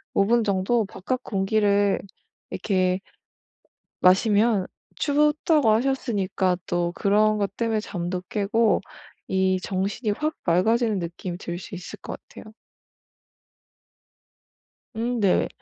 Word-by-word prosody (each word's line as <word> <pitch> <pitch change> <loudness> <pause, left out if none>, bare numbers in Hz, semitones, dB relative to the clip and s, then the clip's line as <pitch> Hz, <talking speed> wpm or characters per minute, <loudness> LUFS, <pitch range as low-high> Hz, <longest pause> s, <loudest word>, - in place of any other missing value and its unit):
5 195 - +4
분 235 +2 +3
정도 205 +3 +1
바깥 250 +6 -4
공기를 200 0 +2 0.5
이렇게 185 -2 0 1.0
마시면 205 +2 +4 0.3
춥다고 300 -2 +2
하셨으니까 215 -6 +1
또 175 0 -1
그런 215 +2 +3
것 200 -1 -2
땜에 225 -2 0
잠도 180 -3 -4
깨고 215 +1 +2 0.5
이 190 0 +1
정신이 200 +4 -2
확 305 +8 -2
맑아지는 215 +5 +2
느낌이 175 +1 -5
들 175 -1 -5
수 190 - -9
있을 180 0 -8
것 - - -7
같아요. 215 - -12 2.4
음 235 +1 -1
네. 195 -3 +3
205 Hz, 205 characters per minute, -24 LUFS, 185-230 Hz, 2.4 s, 5